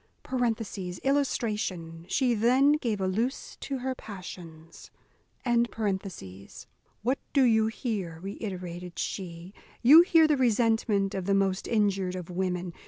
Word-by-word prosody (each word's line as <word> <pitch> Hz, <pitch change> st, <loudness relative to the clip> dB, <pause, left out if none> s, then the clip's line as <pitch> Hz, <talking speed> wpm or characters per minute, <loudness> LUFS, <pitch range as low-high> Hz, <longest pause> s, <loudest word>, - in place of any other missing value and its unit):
[Illustration: 210 Hz, -11 st, -1 dB
She 255 Hz, -3 st, +2 dB
then 250 Hz, +6 st, +4 dB
gave 235 Hz, -9 st, 0 dB
a 190 Hz, -, 0 dB
loose 230 Hz, +8 st, -2 dB
to 275 Hz, -, -4 dB
her 260 Hz, +1 st, -2 dB
passions] 175 Hz, -7 st, -10 dB, 2.1 s
"What 255 Hz, +4 st, +1 dB
do 275 Hz, -, +5 dB
you 220 Hz, -3 st, +4 dB
hear?" 205 Hz, -8 st, -4 dB
reiterated 180 Hz, -3 st, -6 dB
she. 175 Hz, -1 st, -5 dB, 0.3 s
"You 295 Hz, +7 st, +10 dB
hear 330 Hz, -2 st, +5 dB
the 300 Hz, -2 st, +2 dB
resentment 225 Hz, -4 st, +2 dB
of 190 Hz, -2 st, -3 dB
the 200 Hz, 0 st, +2 dB
most 195 Hz, -1 st, 0 dB
injured 195 Hz, -4 st, +1 dB
of 180 Hz, -1 st, -7 dB
women. 180 Hz, -1 st, -2 dB
205 Hz, 115 wpm, -28 LUFS, 180-245 Hz, 2.1 s, You